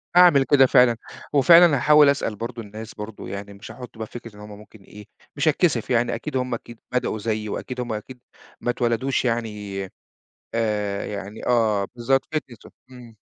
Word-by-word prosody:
هاعمل 175 -6 +7
كده 135 -1 +5
فعلًا، 125 -2 +4 0.4
وفعلًا 165 +3 +7
هاحاول 150 +2 +6
أسأل 135 -6 -1
برضه 115 +2 -6
الناس 110 +1 -9
برضه، 105 0 -8
يعني 100 +1 -7
مش 100 +3 -11
هاحط 125 0 -11
بقى 110 0 -5
فكرة 115 -2 -10
إن - - -14
هُم 105 0 -10
ممكن 105 +1 -16
إيه، 105 +1 -13 0.3
مش 145 +2 -1
هاتكسِف، 150 - +1
يعني 120 -1 +1
أكيد 150 -3 -4
هُم 125 -1 -2
أكيد 120 0 -8
بدأوا 125 -3 -1
زيي 110 0 -2
وأكيد 125 +4 -5
همَّ 120 -2 -4
أكيد 125 +4 -8 0.4
ما - - -2
اتولدوش 120 +3 0
يعني 105 -5 -3 0.7
آآ 105 -3 -1
يعني 100 +1 -7
آه، 110 -5 +2
بالضبط 130 +3 +1
fitness 130 -6 -4
و - - -12 0.2
إمم. 120 -3 -13
115 Hz, 175 wpm, -23 LUFS, 105-130 Hz, 0.7 s, هاعمل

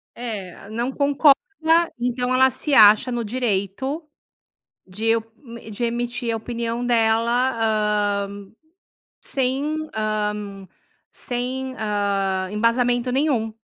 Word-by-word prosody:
É, 200 -5 -7
não 235 +4 -2
concorda 280 +1 +4 0.6
então 245 +1 -1
ela 260 +1 +5
se 285 +3 -3
acha 215 +2 +7
no 240 -1 -2
direito 240 - -2 0.8
de 220 +5 0 0.5
e 220 - -11
de 215 +3 -3
emitir 240 0 -2
a - - -1
opinião 235 +1 -3
dela, 235 +1 +2 0.7
hã, 200 0 -10 0.8
sem, 275 +4 -1 0.2
hã, 210 -2 -3 0.4
sem, 255 +2 -4
hã, 200 -3 -1
embasamento 240 +3 +1
nenhum. 255 -5 0
235 Hz, 100 wpm, -22 LUFS, 210-255 Hz, 0.8 s, acha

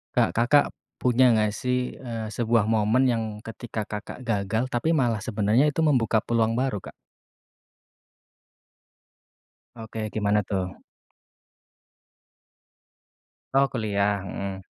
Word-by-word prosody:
Kak, - - +3
Kakak 125 +5 +4 0.3
punya 125 0 +4
nggak 105 -1 +2
sih, 125 0 -1
eee, 115 -4 -5
sebuah 115 0 +1
momen 110 +3 +3
yang 115 -1 0 0.2
ketika 115 -1 -5
Kakak 105 +4 -7
gagal 110 +1 0
tapi 120 +7 0
malah 120 -7 +1
sebenarnya 110 +5 +2
itu 150 - -2
membuka 115 -8 +2
peluang 115 -1 +1
baru, 130 -5 0
Kak? - - -10 2.8
Oke, 110 -1 -5
gimana 105 -1 +1
tuh? 95 -2 -3 2.8
Oh, 140 0 +5
kuliah, 105 -3 0
hmm. 95 -1 -6
115 Hz, 105 wpm, -25 LUFS, 105-125 Hz, 2.8 s, Oh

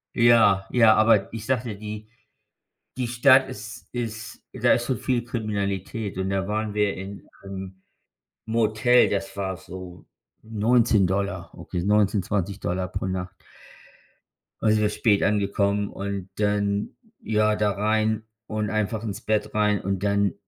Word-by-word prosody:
Ja, 115 -5 +5
ja, 115 -3 +6
aber 110 -3 +4
sage 115 +2 -1
dir, 110 -5 -6
die 105 0 -7 0.9
die 125 -2 -2
Stadt 130 +2 +5
ist 115 -2 -9
ist 115 -2 -5
da - - +3
ist 120 - +1
so 130 - 0
viel 120 +1 -1
Kriminalität. 105 -3 -3
Und 95 +1 -2
da 95 0 -1
waren 110 0 -2
wir 105 -1 +1
in 95 +1 -9 0.2
'nem 95 -1 -8 0.6
Motel. 115 +2 +3
Das 100 -1 -3
war 95 -1 -2
so 90 0 -10 0.4
19$, 105 -4 +1
okay? 90 - -4
19, 105 -1 +3
20$ 95 -1 -2
pro - - -4
Nacht. 95 0 -4 1.3
Da 110 - +2
sind 110 - +3
wir 105 - +2
spät 105 -3 +2
angekommen 100 0 +1
und 100 -1 -5
dann 100 -1 0 0.3
ja, 110 -1 +2
da 105 -1 +1
rein 110 +2 0 0.2
und 105 -1 -2
einfach 110 +1 -1
ins 105 -4 -5
Bett 105 -1 -1
rein 105 -1 +2
und 95 0 -2
dann 100 -2 +2
105 Hz, 140 wpm, -24 LUFS, 100-110 Hz, 1.3 s, ja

